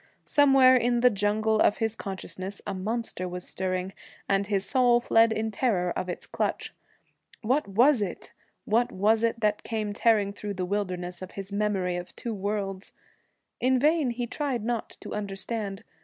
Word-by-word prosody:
Somewhere 270 -3 +6
in 240 -1 +2
the 250 0 +6
jungle 215 +2 +1
of 205 - +4
his 225 -1 -1
consciousness 190 0 -5
a 200 - -3
monster 200 -1 -3
was 180 0 -6
stirring, 185 0 -3 0.3
and 195 0 +1
his 200 -2 0
soul 245 -3 +4
fled 230 -1 +4
in 220 0 -1
terror 195 -6 0
of 185 +1 -3
its 175 - -5
clutch. - - -3 0.7
What 260 +5 +1
was 240 +6 +4
it 190 -4 -5 0.3
what 235 +3 +2
was 215 +4 +2
it 230 0 0
that 210 -1 +1
came 215 -2 -3
tearing 205 -2 +2
through 205 0 -5
the 185 0 -2
wilderness 180 -2 -3
of 185 - -8
his 195 0 -7
memories 195 -4 0
of 175 - -10
two 235 - -4
worlds? 200 -1 -3 0.7
In 255 +1 +3
vain 300 +1 +3
he 240 0 -2
tried 250 -3 -3
not 235 -1 -3
to - - -7
understand. 200 0 -4
210 Hz, 170 wpm, -27 LUFS, 195-235 Hz, 0.7 s, Somewhere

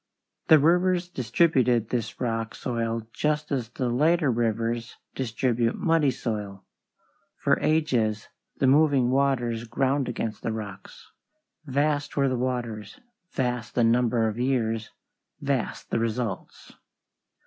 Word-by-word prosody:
The 160 - +8
rivers 175 +4 +3
distributed 125 -5 +2
this 120 -3 -3
rock 115 -2 -2
soil 115 -2 -2
just 150 0 -1
as 125 -5 -1
the 125 +1 -3
later 150 +4 +2
rivers 115 0 -1 0.2
distribute 120 -1 0
muddy 165 -4 +2
soil. 105 -6 -4 0.7
For - - +2
ages 125 -9 +1 0.3
the - - +1
moving 135 -2 +4
waters 120 -4 +1
ground 135 +2 0
against 110 -3 -4
the - - -2
rocks. 105 -3 -9 0.6
Vast 145 +2 0
were 140 -1 +3
the 130 - 0
waters; 120 -4 -3 0.3
vast 125 -5 -2
the 120 - +3
number 115 0 +3
of 110 +2 -3
years; 115 -4 0 0.5
vast - - -2
the - - +1
results. 115 -3 -4
125 Hz, 120 wpm, -26 LUFS, 115-140 Hz, 0.7 s, The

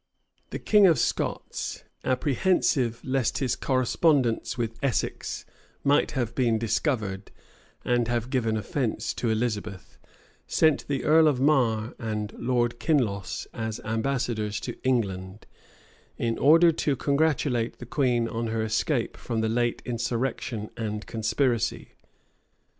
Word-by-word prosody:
The - - -4
king 210 -2 +5
of 165 - +4
Scots, - - -2 0.2
apprehensive 130 -3 +1
lest 130 -2 0
his 130 -3 0
correspondence 130 -1 +1
with 115 -1 -3
Essex 135 -4 -2 0.4
might 145 +1 +3
have 120 -4 -1
been 120 -3 +2
discovered, 110 -4 -1 0.6
and 120 -1 +2
have 120 +1 -2
given 115 -4 +1
offence 115 +3 -2
to 120 - -2
Elizabeth 110 -4 -3 0.5
sent 155 -2 +2
the 140 -2 -1
earl 160 +1 +5
of 140 -4 +2
Marre 125 -6 +2
and 105 -2 -3
Lord 120 -1 0
Kinloss 110 - 0
as 110 -1 -4
ambassadors 110 -2 -1
to 120 - -5
England, 100 -6 -1 0.7
in 115 -1 -1
order 165 +4 +6
to 150 -3 0
congratulate 140 -5 0
the - - -9
queen 125 -8 +1
on 115 0 -3
her 110 0 -1
escape 115 +3 0
from 115 -2 -3
the 110 - 0
late 120 +1 0
insurrection 120 -2 -2
and 105 -2 -4
conspiracy. 120 +1 0
120 Hz, 125 wpm, -26 LUFS, 110-135 Hz, 0.7 s, order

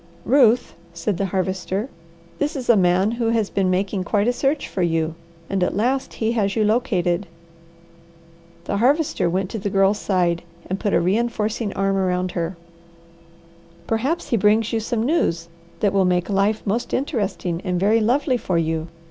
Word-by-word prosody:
"Ruth," 245 -2 +4 0.2
said 170 +3 -2
the 195 - -1
Harvester, 190 +3 -2 0.5
"this 295 +2 -1
is 260 -3 -5
a - - +5
man 185 +2 +3
who 235 -1 -1
has 225 -3 0
been 190 -2 +1
making 190 +1 0
quite 205 +4 +1
a 245 - +3
search 275 +3 0
for 190 - -3
you, 165 -2 0 0.3
and 195 -2 0
at - - 0
last 260 +5 0
he 220 0 0
has 200 -4 0
you 215 - +2
located." 200 -6 +1 1.4
The 200 - -2
Harvester 275 - +2
went 185 +2 -1
to 220 - -4
the 200 +1 -2
Girl's 195 +1 +2
side, 175 -3 +1 0.3
and 190 +1 -3
put 205 -3 0
a - - +4
reinforcing 215 +3 0
arm 195 0 0
around 185 -1 0
her. 170 +1 -3 1.3
"Perhaps 260 - -1
he 235 - +2
brings 215 +2 +2
you 225 - +2
some 225 0 -2
news 170 - 0 0.3
that 205 -2 +2
will 195 -1 +3
make 180 +2 +1
life 200 +2 +1
most 225 +4 -1
interesting 200 - -2
and 180 -2 -1
very 210 +4 +3
lovely 250 +4 +2
for 185 -7 -1
you. 160 0 -1
200 Hz, 175 wpm, -22 LUFS, 185-230 Hz, 1.4 s, a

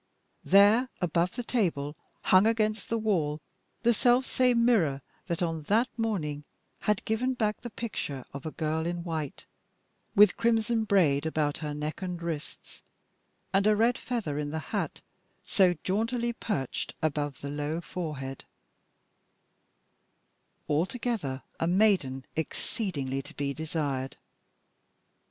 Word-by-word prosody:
There, 210 +6 +6
above 175 0 +1
the 245 - -3
table, 165 - 0 0.3
hung 185 +3 +6
against 220 -1 0
the 230 - +1
wall 170 -9 0 0.4
the 235 0 +5
selfsame 250 +1 +3
mirror 200 - +3 0.2
that 170 -1 -1
on 165 -2 -1
that 230 +5 +3
morning 170 -11 -2 0.4
had 210 -1 0
given 250 +4 0
back 215 -3 0
the 240 - -6
picture 175 - -4
of 140 - -6
a 160 - -3
girl 160 +1 -1
in 175 0 -3
white, 160 -5 -4 0.7
with 205 -2 +7
crimson 225 -1 +2
braid 160 -8 +3
about 150 -2 0
her 150 -2 -4
neck 150 +3 -4
and 180 -2 -3
wrists, 165 -3 -6 0.7
and 195 +2 +4
a 215 - +5
red 230 +3 +3
feather 205 - -3
in 145 -1 -2
the 160 - -3 0.2
hat - - -2 0.4
so 185 -3 +4
jauntily 230 +5 0
perched 140 - -3
above 145 -3 -1
the 140 - -4
low 150 +2 -2
forehead 150 -7 -5 2.2
altogether 170 - -1 0.2
a 165 - +1
maiden 175 -9 +2
exceedingly 155 - -2
to 145 +4 -14
be 140 -1 -1
desired. 145 -4 -3
175 Hz, 130 wpm, -29 LUFS, 150-220 Hz, 2.2 s, with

